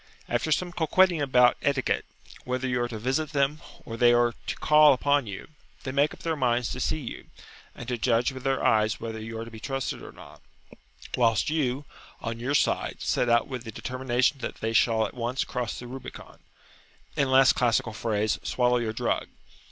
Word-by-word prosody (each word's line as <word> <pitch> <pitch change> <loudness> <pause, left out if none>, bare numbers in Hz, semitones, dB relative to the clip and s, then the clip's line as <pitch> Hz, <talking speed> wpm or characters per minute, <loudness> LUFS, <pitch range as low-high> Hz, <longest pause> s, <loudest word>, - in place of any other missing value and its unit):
After 120 +6 -1
some 175 +3 +1
coquetting 175 0 +3
about 125 -3 +4
"etiquette," 140 -2 0 0.4
whether 130 +1 -2
you 125 -1 0
are 120 - 0
to 115 -2 -6
visit 135 +7 -1
them, 140 +2 +1 0.2
or 115 - -6
they 120 0 +5
are 120 0 +3
to - - -2
call 150 -1 +6
upon 140 -1 +1
you, 100 +5 -7 0.3
they 130 - -4
make 140 +2 +2
up - - -12
their 165 -1 -1
minds 125 -3 0
to - - -5
see 125 - 0
you, 130 - -7 0.5
and 120 - -9
to 125 -2 -2
judge 120 +2 +2
with 130 0 -8
their 135 -1 0
eyes 110 -1 +2
whether 110 -1 -5
you 110 +1 -6
are 115 - -5
to 115 - -11
be 110 - -10
trusted 135 +2 -3
or - - -10
not; - - -15 0.7
whilst 115 +2 +2
you, 145 -3 -1 0.3
on 115 0 -5
your 130 +4 -1
side, - - +1
set 120 - 0
out 120 0 +3
with 125 -3 -6
the 110 - -7
determination 130 +3 -1
that 120 - -5
they 110 0 -3
shall 110 -1 +3
at - - -6
once 125 +2 -2
cross 125 -3 -4
the 125 - -8
Rubicon, 130 +2 -10 0.8
in 135 - +1
less 130 0 +6
classical 115 -2 +1
phrase, 110 -1 -1
swallow 125 0 +1
your 115 -2 -2
drug. - - -1
125 Hz, 200 wpm, -27 LUFS, 115-135 Hz, 0.8 s, call